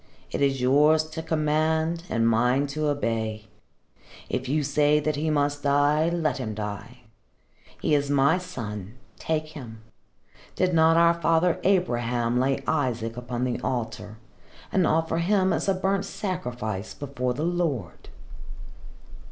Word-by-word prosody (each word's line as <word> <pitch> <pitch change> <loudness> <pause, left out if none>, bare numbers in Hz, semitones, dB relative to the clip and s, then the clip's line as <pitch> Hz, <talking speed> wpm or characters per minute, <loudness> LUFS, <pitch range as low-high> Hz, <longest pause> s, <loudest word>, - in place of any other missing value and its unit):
It - - -3
is 135 -1 +2
yours 150 +5 +4
to 160 - -4
command 160 +1 0
and 115 -1 +1
mine 125 +5 +2
to 155 0 -1
obey. 110 -6 -2 0.8
If - - -3
you 150 +2 +1
say 145 +1 +3
that 155 0 -1
he 155 +2 -1
must 145 -1 0
die, 145 +3 +3
let 165 -4 -1
him 110 -4 -4
die. 110 +4 -6 0.8
He - - 0
is 145 -1 +2
my 145 +5 +3
son. 110 - -7 0.2
Take 155 -1 -2
him. 115 -8 -10 0.7
Did 180 -1 +1
not 165 0 +5
our 170 0 +5
father 165 +1 +2
Abraham 120 -10 +1
lay 135 +1 0
Isaac 120 -6 -1
upon 125 0 -4
the 125 -1 -1
altar 110 -3 -4 0.5
and 185 -4 +2
offer 160 +1 +1
him 190 +1 +2
as - - -1
a 195 - +2
burnt 195 +1 0
sacrifice 120 - -4
before 125 -3 -3
the 150 - -3
Lord?" 165 - -2
145 Hz, 140 wpm, -25 LUFS, 120-160 Hz, 0.8 s, not